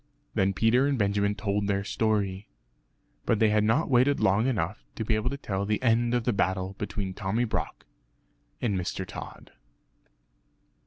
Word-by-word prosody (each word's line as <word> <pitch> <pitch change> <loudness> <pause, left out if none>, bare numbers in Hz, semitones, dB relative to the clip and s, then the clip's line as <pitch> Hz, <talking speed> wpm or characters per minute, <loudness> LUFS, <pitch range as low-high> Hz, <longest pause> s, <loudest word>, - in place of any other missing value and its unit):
Then 95 -2 +2
Peter 120 +7 +3
and 140 -2 +1
Benjamin 100 -1 +1
told 100 -1 -1
their 100 -1 0
story 100 -2 -1 0.8
but 115 - +3
they 110 0 +4
had 105 0 +3
not 115 +9 +2
waited 135 +2 +3
long 100 +6 +3
enough 110 - -2
to 110 - -3
be 110 - +1
able 110 +3 0
to 140 - -4
tell 100 -7 -3
the 105 +1 0
end 120 0 +3
of 120 - 0
the 120 - +1
battle 95 0 0
between 100 -2 -3
Tommy 100 +5 -1
Brock 120 - -3 0.7
and 110 -5 0
Mr. 95 +1 -3
Tod. - - -9
105 Hz, 165 wpm, -27 LUFS, 100-115 Hz, 0.8 s, they